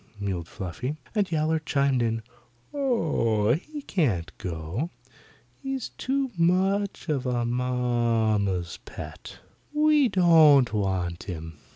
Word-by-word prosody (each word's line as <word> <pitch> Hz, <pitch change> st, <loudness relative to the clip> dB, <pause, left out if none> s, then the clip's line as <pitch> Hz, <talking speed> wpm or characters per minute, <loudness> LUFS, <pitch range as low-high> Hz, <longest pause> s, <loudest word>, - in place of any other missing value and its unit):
mewed 95 Hz, -5 st, -3 dB
Fluffy, 120 Hz, -, -5 dB, 0.2 s
and 205 Hz, -5 st, 0 dB
Yowler 160 Hz, 0 st, +1 dB
chimed 140 Hz, -4 st, +1 dB
in, 115 Hz, -1 st, -1 dB, 0.5 s
"Oh, 155 Hz, -, +1 dB
he 295 Hz, -, -5 dB
can't 105 Hz, -, -1 dB
go. 90 Hz, -, -4 dB, 0.7 s
He's 270 Hz, -3 st, -3 dB
too 270 Hz, 0 st, -2 dB
much 190 Hz, +4 st, +1 dB
of 135 Hz, -5 st, -1 dB
a 120 Hz, -1 st, 0 dB
mamma's 115 Hz, -7 st, 0 dB
pet. -, -, -9 dB, 0.3 s
We 300 Hz, -3 st, +4 dB
don't 155 Hz, -, +6 dB
want 95 Hz, -4 st, -1 dB
him." 80 Hz, -4 st, -7 dB
125 Hz, 105 wpm, -26 LUFS, -, 0.7 s, don't